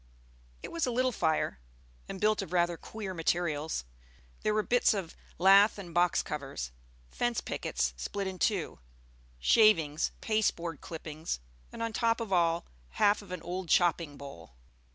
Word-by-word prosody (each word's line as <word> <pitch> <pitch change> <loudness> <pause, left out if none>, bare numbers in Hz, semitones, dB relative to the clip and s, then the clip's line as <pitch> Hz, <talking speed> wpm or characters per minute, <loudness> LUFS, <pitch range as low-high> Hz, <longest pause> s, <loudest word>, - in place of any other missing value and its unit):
It - - -6
was 330 -5 -1
a - - 0
little 255 +2 +2
fire, 160 - 0 0.5
and 190 - -5
built 215 +1 +2
of 195 - -7
rather 175 -1 +2
queer 200 +2 -7
materials. 160 - -1 0.6
There 215 - +1
were 215 - +2
bits 245 -1 +3
of 185 -5 -5 0.2
lath 195 +4 +6
and 180 -4 -8
box 175 +1 +3
covers, 135 - -5 0.4
fence 240 -1 0
pickets - - -2
split 200 -1 -4
in 190 -1 -5
two, 200 -7 0 0.6
shavings, 165 - +4
pasteboard 175 -7 0
clippings, 160 - -5 0.3
and - - -5
on 230 -1 -2
top 230 +1 +2
of 220 -4 -3
all, 170 -1 +2 0.3
half 205 +1 +3
of 200 - -13
an 180 -2 -5
old 180 0 -4
chopping 170 -4 +2
bowl. 85 - -11
180 Hz, 155 wpm, -30 LUFS, 160-215 Hz, 0.6 s, lath